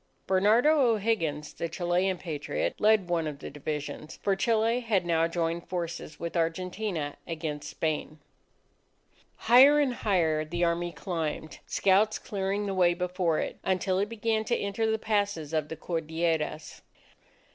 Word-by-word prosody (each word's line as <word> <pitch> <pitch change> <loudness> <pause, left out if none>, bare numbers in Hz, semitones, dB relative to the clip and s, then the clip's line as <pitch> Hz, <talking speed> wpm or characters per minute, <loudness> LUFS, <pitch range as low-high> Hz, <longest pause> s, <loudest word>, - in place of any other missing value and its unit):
Bernardo 220 +11 +4
O'Higgins, 165 -9 -1
the 170 - -4
Chilean 180 +2 0
Patriot, 155 -4 -3
led 210 -3 +4
one 170 -2 0
of 150 -2 -5
the - - -8
divisions; 150 +1 -5
for 195 - +2
Chile 225 +3 +2
had 215 -7 0
now 165 -1 +2
joined 165 0 -2
forces 175 -3 -5
with 170 +1 -5
Argentina 170 -1 -2
against 155 -2 -4
Spain. 155 -1 -3 1.2
Higher 260 +6 +7
and 275 -4 +2
higher 165 -9 +1
the 170 +3 -2
Army 170 0 0
climbed, 160 -4 -4
scouts 200 +3 +3
clearing 200 0 -2
the 195 - -2
way 175 -2 +3
before 180 -2 0
it, - - -3
until 185 0 0
it 205 +1 0
began 225 -1 0
to 235 - +1
enter 200 +3 -1
the 220 - +1
passes 205 -8 -1
of 155 -1 0
the 160 - -5
Cordilleras. 160 -1 -2
175 Hz, 145 wpm, -28 LUFS, 160-205 Hz, 1.2 s, Higher